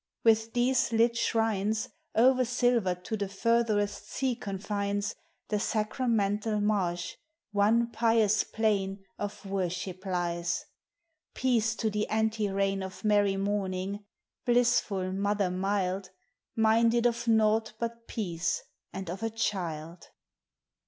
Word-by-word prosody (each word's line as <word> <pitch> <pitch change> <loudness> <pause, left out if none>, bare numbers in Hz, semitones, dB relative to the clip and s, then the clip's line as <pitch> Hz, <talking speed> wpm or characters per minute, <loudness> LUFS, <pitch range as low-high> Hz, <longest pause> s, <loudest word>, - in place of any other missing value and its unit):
With 225 0 +3
these 245 0 +2
lit 230 +1 +3
shrines 220 -2 0 0.3
O'er 255 +2 +5
silvered 235 -7 +1
to 220 - -2
the 200 -2 -2
furtherest 215 -1 0
sea 260 -2 -1
confines, 200 -1 -2 0.4
The 210 - +1
sacramental 215 -1 0
marsh, 185 -5 0 0.3
one 225 +3 +3
pious 225 -2 +3
plain 200 -3 -1 0.2
Of 205 0 -5
worship 185 -1 -3
lies. 175 -2 -1 0.7
Peace 230 -4 +1
to 220 -1 -1
the 210 0 -1
ante 220 -1 0
reign 195 0 0
Of 190 +3 -7
Mary 205 -2 +3
Morning, 195 0 -2 0.4
blissful 235 -6 +2
mother 200 -1 0
mild, 190 0 -1 0.5
Minded 230 +1 +3
of 235 0 +1
naught 220 -1 +3
but 235 0 -5
peace 170 -6 -2 0.3
and 190 -1 -6
of 180 +4 -5
a 225 - 0
Child. 170 -7 -3
210 Hz, 115 wpm, -29 LUFS, 195-225 Hz, 0.7 s, O'er